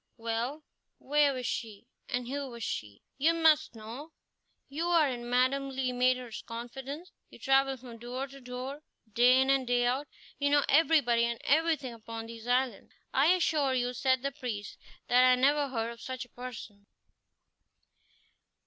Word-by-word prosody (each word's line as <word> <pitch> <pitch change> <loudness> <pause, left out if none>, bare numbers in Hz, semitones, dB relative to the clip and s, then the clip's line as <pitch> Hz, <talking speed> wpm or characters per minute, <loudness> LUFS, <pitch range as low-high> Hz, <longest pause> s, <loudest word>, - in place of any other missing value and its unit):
"Well, 230 +6 -3 0.3
where 290 +1 +3
was 255 -2 -4
she, 220 -2 -4 0.2
and 245 -1 -2
who 275 +1 -4
was 235 -2 -8
she?" 105 - -5 0.2
"You 325 +4 +3
must 310 -4 +3
know: 235 +9 -9 0.5
you 310 +5 -3
are 335 -4 +4
in 240 -2 -5
Madame 260 +3 +2
Le 260 -1 -2
Maître's 250 -1 0
confidence; 265 +8 -7 0.2
you - - -14
travel 270 0 +2
from 240 -2 -11
door 250 +3 -4
to 275 0 -13
door, 255 +3 -6 0.3
day 250 +3 +6
in 265 +1 +3
and 270 -2 +1
day 245 0 +2
out; 260 +4 0 0.3
you 285 0 +2
know 290 0 +4
everybody 280 -7 +4
and 235 -1 -3
everything 300 -4 +1
upon 225 0 -7
these 230 0 -10
islands." 250 -3 0 0.2
"I 275 +3 +4
assure 315 -6 +2
you," 245 0 0
said 260 0 +1
the 275 - -1
priest, 240 -8 -6 0.3
"that 250 +1 +5
I 255 0 +6
never 285 +3 +3
heard 230 -3 -2
of 235 - -12
such 255 -1 -5
a - - -25
person." 225 -5 -9
255 Hz, 165 wpm, -30 LUFS, 240-280 Hz, 0.5 s, day